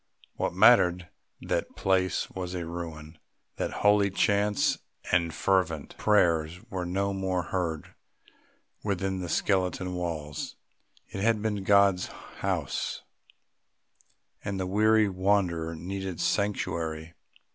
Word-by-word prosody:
What -, -, -2 dB
mattered 90 Hz, -1 st, +5 dB, 0.3 s
that -, -, -1 dB
the -, -, -25 dB
place 95 Hz, -2 st, +1 dB
was 90 Hz, -1 st, -5 dB
a 85 Hz, -2 st, -3 dB
ruin, 80 Hz, -2 st, -7 dB, 0.4 s
that -, -, -1 dB, 0.2 s
holy 105 Hz, -1 st, +5 dB
chants 100 Hz, +1 st, +2 dB, 0.3 s
and 85 Hz, -2 st, +2 dB
fervent 85 Hz, -3 st, 0 dB
prayers 85 Hz, -5 st, +2 dB
were 90 Hz, -2 st, -3 dB
no 100 Hz, +2 st, 0 dB
more 95 Hz, -2 st, -1 dB
heard 80 Hz, -4 st, -3 dB, 0.9 s
within 95 Hz, -2 st, -1 dB
the 90 Hz, -2 st, -5 dB
skeleton 90 Hz, 0 st, 0 dB
walls! 80 Hz, -4 st, -4 dB, 0.5 s
It 95 Hz, -, -5 dB
had 110 Hz, 0 st, +2 dB
been 105 Hz, -3 st, -1 dB
God's 100 Hz, -2 st, +4 dB
house, -, -, -4 dB, 1.4 s
and 100 Hz, -1 st, -3 dB
the 95 Hz, -, -1 dB
weary 110 Hz, +3 st, +4 dB
wanderer 90 Hz, -4 st, 0 dB
needed 95 Hz, +1 st, -5 dB
sanctuary. 85 Hz, -6 st, -1 dB
95 Hz, 115 wpm, -28 LUFS, 85-100 Hz, 1.4 s, mattered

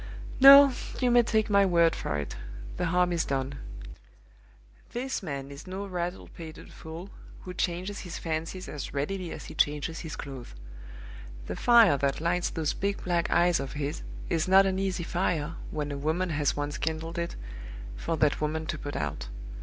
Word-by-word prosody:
"No! 275 Hz, 0 st, +10 dB, 0.3 s
you 250 Hz, -2 st, +3 dB
may 240 Hz, 0 st, +7 dB
take 220 Hz, -2 st, +1 dB
my 200 Hz, -1 st, +5 dB
word 170 Hz, -3 st, +4 dB
for 75 Hz, -, -2 dB
it, 75 Hz, -, -4 dB, 0.4 s
the -, -, 0 dB
harm 180 Hz, +1 st, +2 dB
is 165 Hz, -1 st, +1 dB
done. 135 Hz, 0 st, -2 dB, 1.3 s
This 260 Hz, +2 st, -2 dB
man 140 Hz, -6 st, -5 dB
is 140 Hz, +5 st, -10 dB
no 190 Hz, +2 st, -4 dB
rattle 180 Hz, -1 st, -4 dB
pated 160 Hz, -2 st, -10 dB
fool, 165 Hz, +5 st, -9 dB, 0.3 s
who 180 Hz, -, -7 dB
changes 180 Hz, +3 st, -2 dB
his 175 Hz, -3 st, -6 dB
fancies 165 Hz, +3 st, -3 dB
as 145 Hz, -1 st, -6 dB
readily 175 Hz, +5 st, -2 dB
as 155 Hz, -, -7 dB
he -, -, -8 dB
changes 150 Hz, +2 st, 0 dB
his 160 Hz, -, -6 dB
clothes. 130 Hz, -, -8 dB, 0.9 s
The -, -, -4 dB
fire 230 Hz, -11 st, +6 dB
that 140 Hz, 0 st, 0 dB
lights 175 Hz, +2 st, +1 dB
those 160 Hz, -3 st, -1 dB
big 200 Hz, 0 st, -2 dB
black 170 Hz, -2 st, 0 dB
eyes 175 Hz, 0 st, +4 dB
of 135 Hz, -1 st, -5 dB
his 145 Hz, 0 st, -3 dB, 0.3 s
is 165 Hz, 0 st, 0 dB
not 190 Hz, +1 st, +7 dB
an 190 Hz, 0 st, 0 dB
easy 190 Hz, -3 st, -1 dB
fire, 165 Hz, -3 st, -1 dB, 0.2 s
when 150 Hz, -1 st, -3 dB
a 140 Hz, -, -3 dB
woman 165 Hz, +5 st, 0 dB
has 145 Hz, -2 st, 0 dB
once 145 Hz, 0 st, -3 dB
kindled 165 Hz, +2 st, -2 dB
it, 170 Hz, 0 st, -3 dB, 0.6 s
for 160 Hz, -, -2 dB
that 150 Hz, -1 st, +2 dB
woman 155 Hz, +1 st, -1 dB
to 155 Hz, -1 st, -4 dB
put 145 Hz, -, -6 dB
out. 75 Hz, -4 st, -3 dB
165 Hz, 175 wpm, -28 LUFS, 150-185 Hz, 1.3 s, No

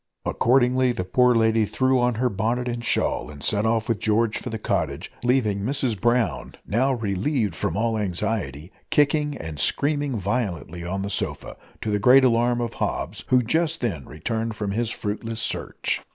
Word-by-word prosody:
Accordingly, 125 Hz, 0 st, +3 dB
the 105 Hz, -, -3 dB
poor 125 Hz, +6 st, +3 dB
lady 110 Hz, 0 st, +3 dB
threw 130 Hz, +4 st, +1 dB
on 120 Hz, -1 st, +2 dB
her 125 Hz, +3 st, +1 dB
bonnet 115 Hz, +3 st, -1 dB
and 120 Hz, -1 st, -3 dB
shawl 120 Hz, -, 0 dB
and 70 Hz, -2 st, -9 dB
set 105 Hz, +1 st, +2 dB
off 115 Hz, -1 st, +1 dB
with 115 Hz, -4 st, 0 dB
George 110 Hz, +1 st, +1 dB
for -, -, -6 dB
the 110 Hz, -, -3 dB
cottage, 105 Hz, -, -2 dB
leaving 120 Hz, -5 st, +2 dB
Mrs 125 Hz, -2 st, -1 dB
Brown, 120 Hz, 0 st, 0 dB
now 130 Hz, +6 st, +1 dB
relieved 110 Hz, -, -1 dB
from 85 Hz, -, -2 dB
all 110 Hz, 0 st, 0 dB
anxiety, 90 Hz, -, -3 dB, 0.2 s
kicking 150 Hz, 0 st, +2 dB
and 80 Hz, -2 st, -7 dB
screaming 145 Hz, -3 st, 0 dB
violently 95 Hz, -, -3 dB
on 95 Hz, +3 st, -3 dB
the 100 Hz, -, -4 dB
sofa, -, -, -3 dB, 0.3 s
to 110 Hz, -, -2 dB
the 105 Hz, -, +1 dB
great 130 Hz, +5 st, +6 dB
alarm 120 Hz, 0 st, +2 dB
of 120 Hz, -, -3 dB
Hobbs, -, -, -3 dB
who 125 Hz, -1 st, +4 dB
just 160 Hz, +6 st, 0 dB
then 90 Hz, -, -3 dB
returned 110 Hz, +9 st, -3 dB
from 105 Hz, -1 st, -3 dB
his 115 Hz, +2 st, -1 dB
fruitless 110 Hz, +1 st, -4 dB
search. -, -, -2 dB
115 Hz, 175 wpm, -24 LUFS, 105-125 Hz, 0.3 s, great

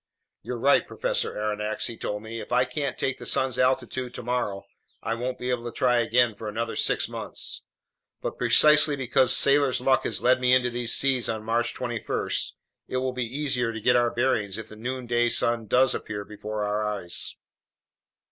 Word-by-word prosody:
"You're 125 Hz, -, -5 dB
right, 135 Hz, +4 st, +3 dB
Professor -, -, -2 dB
Aronnax," 105 Hz, 0 st, -2 dB
he 115 Hz, -, -3 dB
told 105 Hz, -1 st, -4 dB
me. 115 Hz, +1 st, -6 dB
"If -, -, -9 dB
I 125 Hz, +1 st, +3 dB
can't 140 Hz, +2 st, -3 dB
take 135 Hz, -, -2 dB
the -, -, -8 dB
sun's 130 Hz, -2 st, +1 dB
altitude 130 Hz, -1 st, 0 dB
tomorrow, 115 Hz, -5 st, -3 dB, 0.4 s
I -, -, -1 dB
won't 125 Hz, +2 st, -3 dB
be 125 Hz, 0 st, -3 dB
able 120 Hz, -1 st, -2 dB
to 120 Hz, -, -4 dB
try 120 Hz, +2 st, +2 dB
again 120 Hz, 0 st, +3 dB
for 105 Hz, +1 st, -7 dB
another 115 Hz, +2 st, -3 dB
six -, -, +1 dB
months. -, -, -5 dB, 0.6 s
But -, -, -5 dB
precisely 150 Hz, -1 st, +5 dB
because 130 Hz, -1 st, +3 dB
sailors' 140 Hz, -2 st, +4 dB
luck 130 Hz, +1 st, +2 dB
has -, -, -1 dB
led 130 Hz, +1 st, +4 dB
me 125 Hz, 0 st, +5 dB
into 125 Hz, -1 st, +1 dB
these 120 Hz, -1 st, +2 dB
seas 135 Hz, -4 st, +2 dB
on 110 Hz, -1 st, -3 dB
March 115 Hz, +2 st, -1 dB
21, 120 Hz, -3 st, -3 dB, 0.6 s
it 130 Hz, -, -3 dB
will 130 Hz, 0 st, -1 dB
be 125 Hz, -1 st, -2 dB
easy 135 Hz, +1 st, -2 dB
to 110 Hz, -, -6 dB
get 125 Hz, +3 st, +3 dB
our 120 Hz, -1 st, +3 dB
bearings 115 Hz, -5 st, 0 dB
if 110 Hz, -1 st, -8 dB
the 110 Hz, -, -11 dB
noonday 120 Hz, 0 st, -1 dB
sun 115 Hz, -1 st, +1 dB
does 130 Hz, +4 st, +4 dB
appear 105 Hz, -1 st, -5 dB
before 105 Hz, 0 st, -5 dB
our 105 Hz, +1 st, -1 dB
eyes." 100 Hz, -5 st, -2 dB
120 Hz, 185 wpm, -26 LUFS, 110-130 Hz, 0.6 s, precisely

